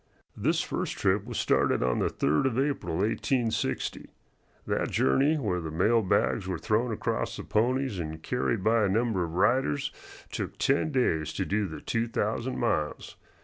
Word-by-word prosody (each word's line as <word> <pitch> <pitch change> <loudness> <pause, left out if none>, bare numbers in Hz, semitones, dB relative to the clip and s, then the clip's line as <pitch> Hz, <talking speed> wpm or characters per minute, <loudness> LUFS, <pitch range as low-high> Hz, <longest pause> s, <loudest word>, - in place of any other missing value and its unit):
This - - +1
first - - -3
trip 100 +1 +1
was 120 -1 -5
started - - +2
on 60 0 +1
the - - +2
3d 75 - +1
of 125 -3 -2
April, 135 - -1
1860. 115 +4 -1 0.6
That - - -1
journey, 140 - +3
where 100 -10 -1
the 80 - -5
mail 105 +9 +3
bags 65 - +1
were 95 -2 -2
thrown 115 +7 0
across 110 - -2
the - - -6
ponies 125 -1 0
and 80 -1 -5
carried 115 -5 -1
by 110 +1 +3
a 100 - +2
number 110 -2 +1
of 85 0 -5
riders, 95 - +2 0.4
took - - -4
ten 140 +3 +1
days 80 - +1
to 95 - -2
do 100 +1 0
the 80 - -8
two 115 0 -1
thousand 115 +3 -2
miles. 105 -11 -1
105 Hz, 170 wpm, -28 LUFS, 85-120 Hz, 0.6 s, journey